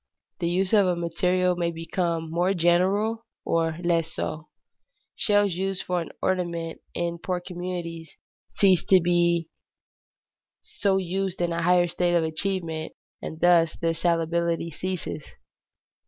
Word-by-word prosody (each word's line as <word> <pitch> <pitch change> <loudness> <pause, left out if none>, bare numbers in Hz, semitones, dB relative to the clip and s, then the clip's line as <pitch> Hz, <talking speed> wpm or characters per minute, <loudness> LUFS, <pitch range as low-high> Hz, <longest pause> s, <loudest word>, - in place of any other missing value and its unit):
The 170 - 0
use 185 +3 0
of 205 -3 +5
a 180 - +1
material 180 +2 +1
may 170 -1 0
become 165 -1 -2
more 180 +3 +1
general 195 +7 +2 0.2
or 165 -1 0
less 165 -2 +1
so. 155 0 -4 0.7
Shells 205 -3 +2
used 190 +1 -2
for 180 -2 -1 0.2
ornament 170 -3 -2
in 170 0 -2
poor 180 +1 -2
communities 175 -2 -6 0.4
cease 190 -3 +4
to 190 -3 +6
be 170 -1 +2 1.1
so 210 - 0
used 190 0 -2
in 175 -1 0
a 170 - -1
higher 175 +1 +4
state 175 0 0
of 170 - +3
advancement, 160 -1 -2 0.3
and 160 - -6
thus 170 -2 +4
their 165 -1 0
salability 170 0 0
ceases. 185 -3 -4
175 Hz, 130 wpm, -25 LUFS, 165-185 Hz, 1.1 s, to